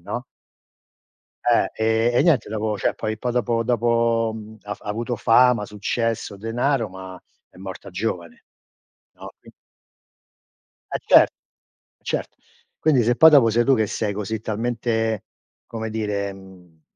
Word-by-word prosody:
no? 115 +7 -5 1.2
Eh, 110 +1 +2
e - - +5
niente 140 -12 +2
dopo 110 0 -2
cioè, - - -1
poi 110 0 -3
dopo 120 -1 0
dopo 115 -1 +1 0.3
ha 105 0 -4
f - - -18
ha 105 - -7
avuto 115 +3 -2
fama, 125 -1 +4
successo, 110 0 -3
denaro, 115 +2 -1
ma 95 0 -10 0.3
è - - -21
morta 95 +1 -9
giovane. 90 -3 -4 0.7
No, - - -11
qui - - -17 1.4
E - - 0
cer - - +7 0.8
certo. - - -4 0.4
Quindi, 140 -6 +3
se 120 +2 +1
poi 160 +3 +8
dopo 135 -6 +6
sei 120 +2 +2
tu 135 - +4
che 110 -2 +1
sei 105 0 -2
così 105 +1 -4
talmente, 115 -1 -2 0.4
come 110 -1 -5
dire, 105 -2 -2
mhmm, 90 -4 -17
110 Hz, 135 wpm, -22 LUFS, 105-120 Hz, 1.4 s, poi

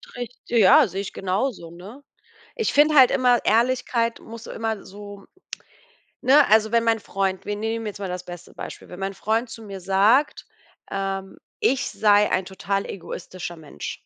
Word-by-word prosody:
Richt 245 0 -7
äh, 235 - +3
ja, 220 +7 +7
sehe 190 +2 -4
ich 200 - -7
genauso, 190 -2 -3
ne? 200 +11 -12 0.5
Ich 450 - -1
finde 300 +1 +4
halt 260 -3 +7
immer, 250 -2 +3
Ehrlichkeit 235 0 +1
muss 230 0 -11
immer 225 -2 -4
so, 205 0 -11 1.0
ne 270 +4 +6
also 220 +1 +4
wenn 230 0 +3
mein 225 -1 +2
Freund 195 -2 -2
wir 205 - -2
nehmen 225 +1 -3
jetzt 205 -1 -6
mal 195 - -4
das 180 0 -5
beste 175 -1 -11
Beispiel, - - -9
wenn 180 - -10
mein 195 0 -3
Freund 225 +4 -1
zu 225 - -10
mir 195 -2 -8
sagt, 200 +10 +2 0.4
ähm, 195 -1 -4 0.2
ich 265 +1 +1
sei 210 -1 +3
ein 185 - +1
total 195 +1 -3
egoistischer 180 -1 -7
Mensch. 150 - -7
210 Hz, 170 wpm, -23 LUFS, 190-235 Hz, 1.0 s, ja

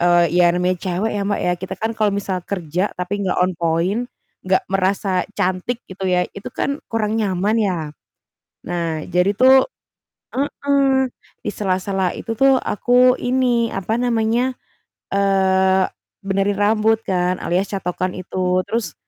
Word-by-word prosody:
eee, 175 0 +4
iya 175 0 +5
namanya 180 +1 +1
cewek 190 +4 -1
ya, 205 - -2
Mbak, 205 - 0
ya 180 - +3
kita 190 - -5
kan 220 - -2
kalau 215 -2 +1
misal 195 -2 -2
kerja, 180 0 -1
tapi 185 +3 -3
enggak 190 - 0
on 185 - +1
point 170 +7 0 0.4
enggak 185 0 +2
merasa 190 0 0 0.2
cantik 185 +6 -1
gitu 190 +1 -10
ya, 180 -1 +2
itu 200 - -7
kan 280 +2 -2
kurang 220 -1 0
nyaman 195 +1 0
ya. 185 -4 0 0.9
Nah 170 -2 -2
jadi 180 +3 +2
tuh 260 +5 +6 0.7
heeh, 275 -1 +1 0.4
di - - +1
sela-sela 190 -1 -1
itu 225 - -4
tuh 270 +3 +4
aku 250 +2 +3
ini, 245 -2 +1
apa 195 +3 -2
namanya, 245 +1 +1 0.5
eee, 190 -1 +3 0.4
benerin 195 +1 +1
rambut 215 +2 +3
kan 180 -2 0
alias 180 +3 0
catokan 185 -1 -2
itu, 185 0 -1
terus, 230 -1 -2
195 Hz, 145 wpm, -20 LUFS, 185-225 Hz, 0.9 s, tuh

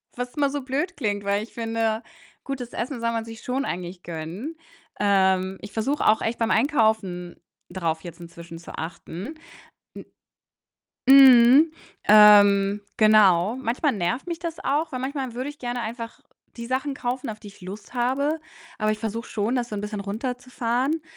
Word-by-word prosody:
was 245 0 -5
immer 285 -2 +2
so 285 0 -3
blöd 280 +8 -3
klingt, 205 -6 -2
weil 200 +1 0
ich 230 - -13
finde, 225 -1 -1 0.4
gutes 255 -3 -6
Essen 250 +1 -4
soll 230 0 0
man 225 -1 -3
sich 225 -1 -10
schon 265 +3 -2
eigentlich 175 0 -5
gönnen. 175 - -6 0.4
Ähm, 190 -2 +2
ich 205 - -9
versuche 270 +7 -1
auch 215 - +4
echt 230 +1 -2
beim 230 -1 +1
Einkaufen 220 - +1 0.3
drauf 165 -3 -2
jetzt 170 0 -10
inzwischen 170 -1 -10
zu 170 - -11
achten. 170 - -7 1.7
M 270 - +8
mhm, 270 +3 +8 0.4
ähm, 205 -1 +7 0.2
genau. 215 -1 +5
Manchmal 260 +3 0
nervt 215 - -2
mich 340 -1 -4
das 335 -2 -5
auch, 310 +3 -1
weil 255 - -4
manchmal 265 -2 -4
würde 255 +4 -4
ich 290 - -14
gerne 245 -1 -3
einfach 230 +1 -6 0.4
die 235 0 -6
Sachen 265 +3 -2
kaufen, 250 0 -3
auf 215 -1 -6
die 210 - -11
ich 200 - -16
Lust 200 +6 -10
habe, 280 +6 0 0.4
aber 215 0 +1
ich 215 - -5
versuche 225 +1 -4
schon, 220 +4 -1
das 245 -1 -1
so 210 - -6
'n - - -3
bisschen 210 0 -5
runterzufahren. 250 +6 -2
230 Hz, 170 wpm, -24 LUFS, 200-260 Hz, 1.7 s, M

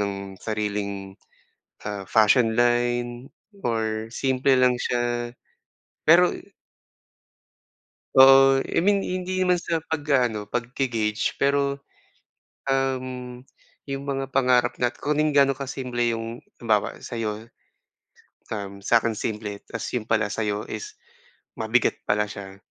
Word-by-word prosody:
ng 100 -1 -1 0.3
sariling, 100 -2 -3 0.7
ah, 105 -1 -4
fashion 110 +1 +4
line 120 +1 +1 0.3
or 110 -1 -1
simple 130 +1 +1
lang 125 -1 +4
siya 120 -1 -1 0.8
pero 175 +3 +7 1.9
Oh, 135 0 +8
I - - -4
mean, 200 +3 +3
hindi 185 0 -2
naman 180 -1 +3
sa 170 -1 -2
pag-aano, 130 -9 0
pagge-gauge 115 -1 -1
pero, 140 0 +1 0.9
um, 130 -2 -2 0.4
yung 135 -1 -5
mga 135 -1 -3
pangarap 125 -2 +2
natin 120 0 -1
kung 150 0 +1 0.2
gaano 140 -1 +5
kasimple 125 -3 -2
yung 115 +1 -6 0.2
halimbawa 110 -3 0
sa'yo, 110 -1 -5 1.0
um, 100 -2 -6
sa'kin 115 0 +2
simple 105 -1 -4
ta's 115 - -5
yun 115 - -2
pala 110 -1 +1
sa'yo 105 -1 -2
is 425 0 -6 0.6
mabigat 115 +2 +1
pala 105 0 +2
siya, 100 -2 -9
120 Hz, 110 wpm, -24 LUFS, 110-135 Hz, 1.9 s, Oh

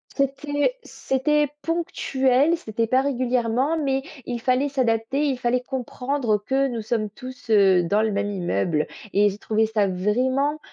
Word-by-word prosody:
C'était 290 - 0
c'était 295 +3 0 0.2
ponctuel, 285 -3 +1
c'était 230 -7 -2
pas 255 +3 +2
régulièrement 255 +2 0
mais 270 -1 0 0.2
il 240 -1 -3
fallait 255 +4 +1
s'adapter, 260 +1 0
il 265 -3 -1
fallait 245 +1 +1
comprendre 250 -2 -2
que 270 +6 0
nous 235 -4 -4
sommes 215 -1 -1
tous, 255 +3 -11
heu, 195 -4 +5
dans 205 +5 +1
le 220 - 0
même 200 0 -1
immeuble 170 - -1 0.3
et 205 +1 +4
j'ai 200 - -10
trouvé 220 +1 +1
ça 215 -2 +1
vraiment, 255 +10 0
250 Hz, 150 wpm, -23 LUFS, 215-275 Hz, 0.3 s, heu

